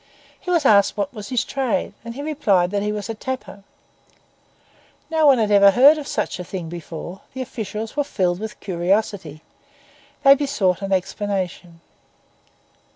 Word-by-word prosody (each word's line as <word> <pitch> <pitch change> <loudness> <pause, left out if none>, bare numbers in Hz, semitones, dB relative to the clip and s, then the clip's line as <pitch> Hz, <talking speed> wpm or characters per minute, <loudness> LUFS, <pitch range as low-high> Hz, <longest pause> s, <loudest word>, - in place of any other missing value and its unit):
He - - -8
was 340 -5 +2
asked 205 -3 +4
what 200 0 -2
was 210 -3 -8
his 250 -3 0
trade, 260 -7 -2
and 230 +2 -8
replied 215 - +1
that 200 -1 0
he 210 +1 -1
was 210 -1 -4
a 225 - -3
tapper. 225 -4 -6 1.5
No 315 -2 +3
one 275 -2 +6
had 215 -2 +1
ever 200 -1 +7
heard 280 +9 +6
of 290 - -7
such - - -2
a - - -4
thing 175 -2 -6
before; 170 +2 -8
the 260 - -3
officials 220 -1 -6
were 290 - +1
filled 185 -9 -1
with 215 0 -7
curiosity; 185 -3 -1 0.8
they 275 -1 +9
besought 250 -11 0
an 195 0 -4
explanation. 185 -3 -3
205 Hz, 155 wpm, -21 LUFS, 185-260 Hz, 1.5 s, they